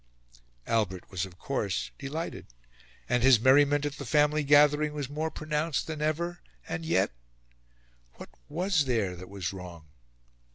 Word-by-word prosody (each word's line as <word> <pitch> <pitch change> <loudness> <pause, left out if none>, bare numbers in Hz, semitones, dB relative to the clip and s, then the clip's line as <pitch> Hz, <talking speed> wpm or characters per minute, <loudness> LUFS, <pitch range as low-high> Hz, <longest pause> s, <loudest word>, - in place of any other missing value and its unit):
Albert 100 -5 -1
was 95 -1 -2
of 90 -1 -17
course 105 -6 -2
delighted, 155 +3 -5 0.6
and 125 0 +1
his 130 -2 +6
merriment 145 +4 +4
at 145 0 -4
the - - -6
family 150 0 +2
gathering 150 +1 +4
was 145 -3 -3
more 155 +2 -2
pronounced 155 0 -2
than 155 -2 -5
ever: 170 +3 -1 0.3
and 165 - -4
yet... 95 - +2 1.0
what - - -11 0.2
was 170 0 +1
there 110 -8 0
that 90 +1 -10
was 100 -3 -4
wrong? 85 -5 -10
145 Hz, 140 wpm, -28 LUFS, 100-155 Hz, 1.0 s, his